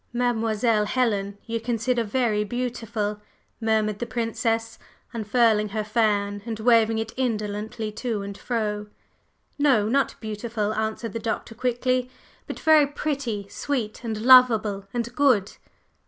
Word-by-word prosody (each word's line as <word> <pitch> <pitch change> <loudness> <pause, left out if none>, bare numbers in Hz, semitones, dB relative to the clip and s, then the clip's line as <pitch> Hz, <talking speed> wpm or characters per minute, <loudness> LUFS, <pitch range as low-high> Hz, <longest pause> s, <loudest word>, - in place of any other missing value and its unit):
"Mademoiselle 225 -2 +1
Helen 205 -4 0
you 230 -1 -2
consider 235 +1 0
very 220 -2 0
beautiful?" 225 -2 -3 0.4
murmured 215 -2 0
the 240 - -3
Princess, 225 -1 -2 0.3
unfurling 220 -1 +2
her 215 +1 -2
fan 210 -2 0
and 225 -1 -5
waving 225 -1 +4
it 225 0 -3
indolently 215 -2 -2
to 215 -2 -3
and 200 0 -6
fro. 210 -2 -2 0.7
"No, 260 -8 +3
not 275 +5 +1
beautiful," 215 -1 -3
answered 220 +1 -3
the 230 - -3
Doctor 225 0 -3
quickly. 250 +1 0 0.4
"But - - -6
very 310 -2 +5
pretty, 275 -8 -3
sweet 245 -2 -3
and 220 -2 -3
lovable 225 -6 +5
and 235 0 -3
good." 250 -9 +2
225 Hz, 125 wpm, -25 LUFS, 210-245 Hz, 0.7 s, very